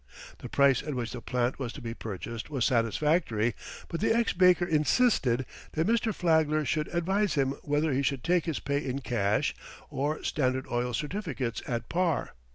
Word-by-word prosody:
The -, -, -8 dB
price 140 Hz, -2 st, +4 dB
at 150 Hz, -2 st, -4 dB
which 120 Hz, -3 st, -3 dB
the 120 Hz, -, -6 dB
plant 125 Hz, +1 st, -1 dB
was 125 Hz, -4 st, -3 dB
to -, -, -8 dB
be 115 Hz, -3 st, -5 dB
purchased 115 Hz, +2 st, -6 dB
was 135 Hz, -5 st, 0 dB
satisfactory, 120 Hz, -, +1 dB, 0.3 s
but 170 Hz, -, -4 dB
the -, -, +2 dB
ex 230 Hz, +1 st, +2 dB
baker 180 Hz, -1 st, +5 dB
insisted 150 Hz, -, +2 dB, 0.3 s
that 160 Hz, +1 st, +1 dB
Mr. 230 Hz, 0 st, +2 dB
Flagler 160 Hz, -5 st, +2 dB
should 150 Hz, +5 st, 0 dB
advise 190 Hz, +4 st, 0 dB
him 135 Hz, -2 st, +2 dB
whether 145 Hz, 0 st, 0 dB
he 135 Hz, -, +1 dB
should 140 Hz, -2 st, -1 dB
take 175 Hz, -1 st, +2 dB
his 160 Hz, -4 st, -2 dB
pay 140 Hz, +1 st, -1 dB
in 135 Hz, +1 st, -3 dB
cash 105 Hz, -5 st, 0 dB, 0.4 s
or 145 Hz, +3 st, -2 dB
Standard 130 Hz, -2 st, 0 dB
Oil 120 Hz, 0 st, 0 dB
certificates 150 Hz, -, -3 dB
at 120 Hz, -2 st, -3 dB
par. 170 Hz, -2 st, 0 dB
140 Hz, 175 wpm, -29 LUFS, 125-165 Hz, 0.4 s, baker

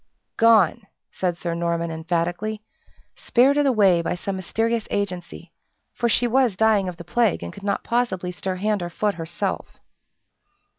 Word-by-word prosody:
"Gone!" 220 Hz, -2 st, +4 dB, 0.2 s
said 180 Hz, -2 st, -2 dB
Sir 170 Hz, -1 st, -3 dB
Norman 170 Hz, 0 st, -1 dB
emphatically, 175 Hz, +6 st, -2 dB, 0.5 s
"spirited 280 Hz, +4 st, +3 dB
away 200 Hz, -9 st, +4 dB
by 170 Hz, -, -2 dB
some 195 Hz, +2 st, -4 dB
mysterious 225 Hz, +4 st, -1 dB
agency; 180 Hz, -4 st, -4 dB, 0.4 s
for 235 Hz, -, 0 dB
she 245 Hz, -, +2 dB
was 240 Hz, -3 st, +2 dB
dying 210 Hz, -2 st, +3 dB
of 175 Hz, -, -8 dB
the 170 Hz, -, -8 dB
plague, 215 Hz, -, +1 dB
and 85 Hz, -, -6 dB
could -, -, -11 dB
not 200 Hz, 0 st, -1 dB
possibly 230 Hz, -7 st, -1 dB
stir 185 Hz, +1 st, -4 dB
hand 205 Hz, +1 st, -1 dB
or 175 Hz, -, -3 dB
foot 205 Hz, +4 st, -1 dB
herself." 165 Hz, -1 st, -4 dB
195 Hz, 150 wpm, -23 LUFS, 175-225 Hz, 0.5 s, Gone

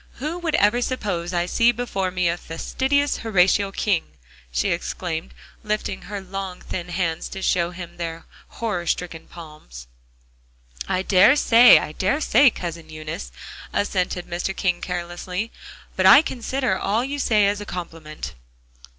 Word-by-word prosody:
Who 305 Hz, +7 st, -4 dB
would 325 Hz, -3 st, -1 dB
ever 210 Hz, +2 st, +3 dB
suppose 200 Hz, -9 st, -2 dB
I 175 Hz, -1 st, 0 dB
see 230 Hz, +6 st, +3 dB
before 220 Hz, -6 st, -2 dB
me 180 Hz, -2 st, 0 dB
fastidious 265 Hz, -, -1 dB
Horatio 195 Hz, -2 st, +2 dB
King!" 195 Hz, -3 st, 0 dB, 0.5 s
she -, -, 0 dB
exclaimed, 170 Hz, -1 st, -3 dB, 0.3 s
lifting 210 Hz, -2 st, -3 dB
her 205 Hz, 0 st, -6 dB
long 190 Hz, -1 st, -6 dB
thin 180 Hz, -1 st, -5 dB
hands 170 Hz, -2 st, -2 dB
to 195 Hz, -, -7 dB
show 170 Hz, -2 st, +2 dB
him 175 Hz, -1 st, -9 dB
their 165 Hz, -1 st, -5 dB, 0.2 s
horror 200 Hz, -7 st, -4 dB
stricken 165 Hz, -2 st, -3 dB
palms. 150 Hz, -, -11 dB, 1.0 s
"I 185 Hz, -, 0 dB
dare 195 Hz, +7 st, +6 dB
say, 245 Hz, -4 st, +7 dB
I -, -, -2 dB
dare 195 Hz, -, 0 dB
say, 285 Hz, -3 st, +5 dB
Cousin 170 Hz, -6 st, -7 dB
Eunice," 155 Hz, -, -7 dB, 0.4 s
assented 180 Hz, -3 st, -1 dB
Mr. 180 Hz, +2 st, -3 dB
King 180 Hz, -3 st, 0 dB
carelessly, 180 Hz, +4 st, -4 dB, 0.4 s
"but -, -, +4 dB
I 285 Hz, -, +9 dB
consider 255 Hz, -4 st, -1 dB
all 220 Hz, +5 st, 0 dB
you 285 Hz, +1 st, -4 dB
say 215 Hz, -6 st, +3 dB
as 205 Hz, +1 st, 0 dB
a -, -, -6 dB
compliment." 165 Hz, -3 st, -7 dB
185 Hz, 145 wpm, -23 LUFS, 170-225 Hz, 1.0 s, I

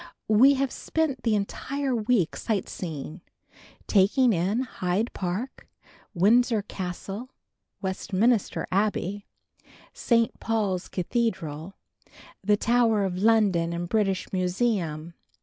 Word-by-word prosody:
We 255 Hz, +6 st, +6 dB
have 270 Hz, -1 st, 0 dB
spent 310 Hz, -6 st, -2 dB
the 225 Hz, -3 st, +1 dB
entire 265 Hz, +7 st, -2 dB
week 220 Hz, -6 st, +1 dB
sightseeing, 170 Hz, -6 st, -4 dB, 0.6 s
taking 220 Hz, +5 st, +4 dB
in 190 Hz, +7 st, 0 dB
Hyde 210 Hz, -2 st, -2 dB
Park, 190 Hz, +8 st, -4 dB, 0.5 s
Windsor 220 Hz, +4 st, +3 dB
Castle, 195 Hz, +5 st, -6 dB, 0.5 s
Westminster 195 Hz, +4 st, 0 dB
Abbey, 200 Hz, 0 st, -1 dB, 0.7 s
St. 230 Hz, -2 st, +1 dB
Paul's 205 Hz, -5 st, -1 dB
Cathedral, 180 Hz, -5 st, -2 dB, 0.7 s
the 205 Hz, +1 st, +3 dB
Tower 230 Hz, -3 st, +2 dB
of 180 Hz, -1 st, -3 dB
London 200 Hz, -6 st, +3 dB
and 175 Hz, +1 st, -3 dB
British 195 Hz, -1 st, 0 dB
Museum. 180 Hz, -4 st, -1 dB
205 Hz, 95 wpm, -26 LUFS, 180-235 Hz, 0.7 s, We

